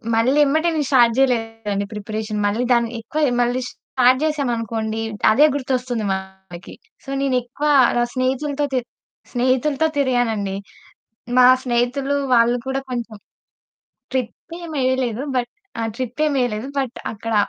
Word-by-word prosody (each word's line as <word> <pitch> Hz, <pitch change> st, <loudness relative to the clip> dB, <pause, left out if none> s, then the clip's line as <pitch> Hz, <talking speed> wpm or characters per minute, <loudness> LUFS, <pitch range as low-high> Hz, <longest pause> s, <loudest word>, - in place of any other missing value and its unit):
మళ్ళీ 245 Hz, +5 st, +2 dB
ఎమ్మటే 315 Hz, +4 st, +2 dB
నేను 295 Hz, -3 st, 0 dB
స్టార్ట్ 240 Hz, -4 st, +5 dB
జేయలేదండి 225 Hz, -6 st, 0 dB
ప్రిపరేషన్. 215 Hz, 0 st, -4 dB
మళ్ళీ 210 Hz, +4 st, 0 dB
దాని 235 Hz, -1 st, +2 dB
ఎక్కువ 300 Hz, +7 st, -3 dB, 0.2 s
మళ్ళీ 245 Hz, +1 st, 0 dB
స్టార్ట్ 255 Hz, 0 st, +2 dB
జేసామనుకోండి 230 Hz, -7 st, -1 dB, 0.3 s
అదే 275 Hz, +8 st, +6 dB
గుర్తొస్తుంది 255 Hz, -4 st, -2 dB
మనకి. 190 Hz, -2 st, -7 dB, 0.3 s
సో 275 Hz, -, -11 dB
నేనెక్కువ 255 Hz, +1 st, -1 dB, 0.3 s
ర -, -, +3 dB
స్నేహితులతో 275 Hz, +3 st, -1 dB
తి 255 Hz, -, +3 dB, 0.5 s
స్నేహితులతో 260 Hz, +5 st, +1 dB
తిరిగాను 245 Hz, -4 st, +2 dB
అండి. 200 Hz, -2 st, -3 dB, 0.8 s
మా 250 Hz, -, +8 dB, 0.2 s
స్నేహితులు 250 Hz, +3 st, 0 dB, 0.2 s
వాళ్ళు 240 Hz, 0 st, +4 dB
కూడా 265 Hz, 0 st, -1 dB
కొంచెం 235 Hz, -3 st, -4 dB, 1.0 s
ట్రిప్పేమెయ్యలేదు. 260 Hz, -3 st, -2 dB
బట్ 240 Hz, -1 st, -1 dB, 0.3 s
ఆ! -, -, -1 dB
ట్రిప్పేమెయ్యలేదు. 255 Hz, -3 st, -1 dB
బట్ 260 Hz, -2 st, -2 dB, 0.2 s
అక్కడ 225 Hz, +1 st, -4 dB
245 Hz, 115 wpm, -21 LUFS, 225-270 Hz, 1.0 s, మా